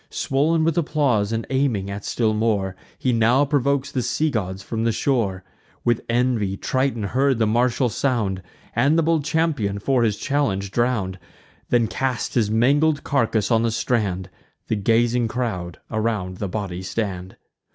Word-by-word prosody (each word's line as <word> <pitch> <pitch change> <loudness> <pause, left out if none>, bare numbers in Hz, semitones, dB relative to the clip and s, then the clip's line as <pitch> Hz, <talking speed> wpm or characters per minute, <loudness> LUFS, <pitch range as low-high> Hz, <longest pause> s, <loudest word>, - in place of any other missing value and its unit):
Swoln 155 +4 +1
with 165 +1 +2
applause, 140 -10 +1
and 115 0 -2
aiming 110 -8 0
still 110 +2 0
at - - -2
more, 105 -4 0 0.2
He 130 - 0
now 120 +5 +4
provokes 140 -1 0
the 130 - -1
sea 155 +5 0
gods 95 -4 -3
from 110 +2 -3
the 115 - +2
shore; 110 -7 0 0.4
With 120 -1 +2
envy 115 -5 +1
Triton 130 -2 -1
heard 130 +5 +1
the 110 - +2
martial 120 +3 +2
sound, 110 -6 -1 0.3
And 140 +7 +3
the 165 - +3
bold 160 -1 +2
champion, 145 -10 0
for 125 +5 +1
his 110 -3 +1
challenge, 100 -10 -1
drown'd; 110 -6 0 0.5
Then 120 -2 +3
cast 130 +2 -2
his 110 -4 +2
mangled 140 +7 +3
carcass 115 -5 +1
on 115 -1 +4
the 115 - +1
strand: 100 -5 -1 0.4
The 110 - +2
gazing 115 +3 +2
crowd 100 -8 -3
around 110 -5 -1
the 100 -1 -3
body 95 -3 -4
stand. 95 -2 -4
115 Hz, 160 wpm, -22 LUFS, 100-135 Hz, 0.5 s, now